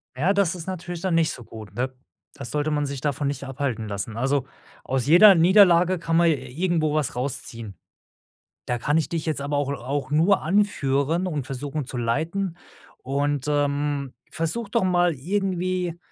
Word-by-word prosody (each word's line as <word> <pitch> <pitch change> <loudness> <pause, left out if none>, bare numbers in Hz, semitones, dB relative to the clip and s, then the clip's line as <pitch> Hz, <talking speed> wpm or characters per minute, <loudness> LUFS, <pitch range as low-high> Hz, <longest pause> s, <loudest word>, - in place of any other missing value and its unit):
Ja, 165 +10 +2
das 195 -3 +1
ist 170 0 -8
natürlich 175 -2 -5
dann 185 -2 0
nicht 165 -1 +2
so 120 - -8
gut, 110 -3 -11
ne? 130 +4 -2 0.4
Da - - -8
sollte 150 +5 -2
man 145 -1 0
sich 140 -2 -5
davon 145 0 -1
nicht 140 -1 -3
abhalten 130 -5 -3
lassen. 100 +2 -4
Also, 135 +1 0 0.4
aus 130 -2 -1
jeder 185 +6 +8
Niederlage 180 0 +5
kann 165 0 0
man 170 - +5
j 155 - +2
irgendwo 155 +4 -1
was 150 -5 -1
rausziehen. 115 -5 -4 0.9
Da 120 - -1
kann 145 +6 +1
ich 160 - 0
dich 165 -2 -3
jetzt 155 -3 -1
aber 145 +1 -1
auch 145 -1 -1
auch 140 +1 -4
nur 170 +6 +3
anführen 165 -3 +1
und 150 -7 -3
versuchen 140 +2 -4
zu 125 - -6
leiten 160 +10 -1 0.5
und, 140 +1 -1
ähm, 145 -1 -1 0.2
versuche 170 +8 -3
doch 230 0 +1
mal 175 -2 +2
irgendwie, 185 +2 -2
150 Hz, 175 wpm, -24 LUFS, 135-175 Hz, 0.9 s, jeder